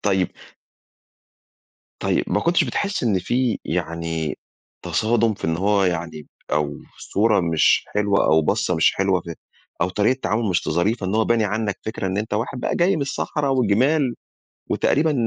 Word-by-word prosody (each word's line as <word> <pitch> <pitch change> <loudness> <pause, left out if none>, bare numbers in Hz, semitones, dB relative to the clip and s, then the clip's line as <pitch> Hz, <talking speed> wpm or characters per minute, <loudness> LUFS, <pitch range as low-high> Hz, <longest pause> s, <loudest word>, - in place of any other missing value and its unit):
طيب 95 -3 +1 1.7
طيب، - - +1
ما - - 0
كنتش 170 +1 +2
بتحِس 200 0 -2
إن 110 -6 +2
في 120 +6 0
يعني 80 -2 -3 0.4
تصادُم 115 0 +1
في - - -10
إن 80 0 0
هو 100 +2 +2
يعني 80 -4 -3 0.3
أو 75 -1 0 0.2
صورة 105 0 +1
مش 80 -3 +3
حلوة 105 -1 +2
أو 80 0 +4
بصّة 90 - 0
مش 80 - +3
حلوة 95 -1 +1
في 85 0 -8 0.5
أو 85 - +2
طريقة 105 +5 +2
التعامل 115 -3 -1
مش 90 -3 +1
ت - - -5
ظريفة 95 +6 0
إن 95 - -1
هو 110 0 +3
باني 115 -1 +2
عنّك 105 0 -2
فكرة 110 -3 -3
إن 95 0 -2
أنت 105 0 -3
واحد 120 +4 -3
بقى - - -1
جاي 175 +2 +3
من 150 - -1
الصحرا 140 +1 -2
والجِمال 130 +2 +2 0.6
وتقريبًا 155 +2 +2
105 Hz, 165 wpm, -22 LUFS, 85-120 Hz, 1.7 s, أو